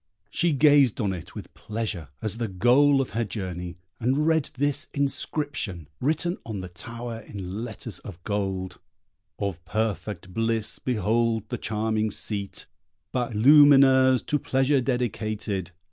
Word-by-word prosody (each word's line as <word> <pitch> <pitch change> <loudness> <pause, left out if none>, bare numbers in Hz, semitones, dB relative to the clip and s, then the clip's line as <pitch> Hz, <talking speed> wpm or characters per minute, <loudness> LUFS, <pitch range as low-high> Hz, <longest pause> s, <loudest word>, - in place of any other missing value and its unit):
She 175 -1 +2
gazed 145 -4 +5
on 100 -4 0
it 90 - -9
with - - -9
pleasure 105 -7 -4 0.2
as 110 +1 -2
the 115 - -1
goal 130 +8 +4
of 130 - -4
her 115 - 0
journey, 90 -5 -5 0.2
and 130 +6 +1
read 160 -2 +2
this 145 +1 +1
inscription, 140 - -2
written 160 +6 0
on 110 -3 -5
the 90 - -7
tower 115 +6 -6
in 100 0 -6
letters 110 -4 -7
of 95 -5 -9
gold: 95 -3 -3 0.6
Of 95 -3 -3
perfect 105 -3 -3
bliss 115 0 -1
behold 115 -1 0
the - - -3
charming 110 0 0
seat, 100 -1 -3 0.5
By 125 -2 -1
Lumineuse 135 +1 +6
to 150 - +1
pleasure 135 +1 +2
dedicated. 110 -6 -2
115 Hz, 135 wpm, -26 LUFS, 100-135 Hz, 0.6 s, Lumineuse